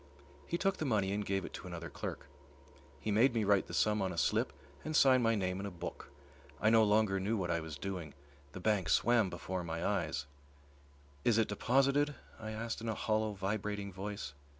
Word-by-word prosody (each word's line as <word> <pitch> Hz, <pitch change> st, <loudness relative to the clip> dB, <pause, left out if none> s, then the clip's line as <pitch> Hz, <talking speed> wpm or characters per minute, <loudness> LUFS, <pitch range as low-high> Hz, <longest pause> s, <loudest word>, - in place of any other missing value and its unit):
He 170 Hz, -, -1 dB
took 195 Hz, +1 st, +1 dB
the 155 Hz, -, -2 dB
money 105 Hz, -7 st, +1 dB
and 105 Hz, +1 st, -1 dB
gave 95 Hz, -2 st, -1 dB
it -, -, -9 dB
to -, -, -7 dB
another 85 Hz, -1 st, -6 dB
clerk. -, -, -5 dB, 0.7 s
He 110 Hz, -, -2 dB
made 120 Hz, +4 st, +4 dB
me 110 Hz, -, +2 dB
write 100 Hz, -1 st, +3 dB
the -, -, -8 dB
sum 105 Hz, -1 st, +2 dB
on 95 Hz, -1 st, 0 dB
a 85 Hz, -, -6 dB
slip -, -, +2 dB, 0.3 s
and 155 Hz, -, -3 dB
sign 130 Hz, -3 st, +6 dB
my 115 Hz, -1 st, +3 dB
name 95 Hz, -2 st, -1 dB
in 100 Hz, -, -3 dB
a -, -, -3 dB
book. 85 Hz, -1 st, -7 dB, 0.5 s
I 110 Hz, -, +4 dB
no 115 Hz, -1 st, +6 dB
longer 105 Hz, -2 st, +3 dB
knew 105 Hz, +4 st, 0 dB
what 90 Hz, -3 st, -1 dB
I 85 Hz, -, +1 dB
was 80 Hz, -2 st, -6 dB
doing. 85 Hz, -3 st, -5 dB, 0.4 s
The -, -, -6 dB
bank 95 Hz, -3 st, +1 dB
swam 120 Hz, -5 st, +4 dB
before 90 Hz, +1 st, -4 dB
my 85 Hz, 0 st, -3 dB
eyes. 75 Hz, -, -1 dB, 1.0 s
"Is 115 Hz, -2 st, +4 dB
it 115 Hz, -, +3 dB
deposited?" 135 Hz, +7 st, +2 dB, 0.2 s
I 110 Hz, -1 st, -6 dB
asked 110 Hz, +1 st, -4 dB
in 115 Hz, -, -3 dB
a 110 Hz, -, -1 dB
hollow, 110 Hz, 0 st, 0 dB
vibrating 100 Hz, 0 st, -3 dB
voice. 100 Hz, -5 st, -5 dB
105 Hz, 205 wpm, -34 LUFS, 95-115 Hz, 1.0 s, sign